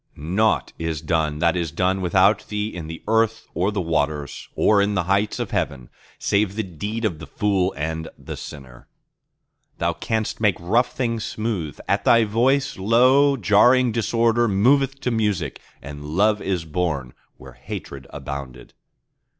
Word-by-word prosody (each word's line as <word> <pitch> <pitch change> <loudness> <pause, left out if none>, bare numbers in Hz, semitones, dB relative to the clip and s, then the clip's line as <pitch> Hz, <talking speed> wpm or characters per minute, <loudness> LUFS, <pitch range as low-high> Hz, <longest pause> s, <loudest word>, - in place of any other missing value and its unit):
Nought 95 +9 0
is 80 -2 -2
done 80 -1 0
that 85 +2 +2
is 85 -2 -1
done 95 +3 0
without 95 +4 +3
Thee 105 0 -2
in 85 -3 -6
the 80 +1 -8
earth 115 0 +1
or 90 +5 0
the 100 -2 -2
waters 75 -3 -2
Or 105 -2 +4
in 100 +1 +1
the 95 - +1
heights 100 +4 +1
of - - -4
heaven, 65 -4 -3 0.3
save 100 -1 0
the 110 - -1
deed 105 +6 -4
of 85 -7 -1
the 80 - -9
fool 100 -4 0
and 80 +2 -3
the - - -7
sinner. 65 -4 -11 0.9
Thou - - 0
canst 110 0 -3
make 105 -5 +3
rough 110 +9 +1
things 115 -4 -2
smooth; 105 - -3
at - - +1
Thy 115 -1 +5
voice, 125 +4 +1
lo, 130 +7 +4
jarring 120 +4 +4
disorder 115 +1 +2
Moveth 135 +7 +2
to 125 - -1
music, 105 -4 -1 0.2
and 75 +1 -8
Love 105 +8 +1
is 90 -4 -2
born 75 -6 -2 0.2
where 65 -1 -13
hatred 65 +2 -8
abounded. 65 -3 -8
100 Hz, 160 wpm, -22 LUFS, 80-110 Hz, 0.9 s, Thy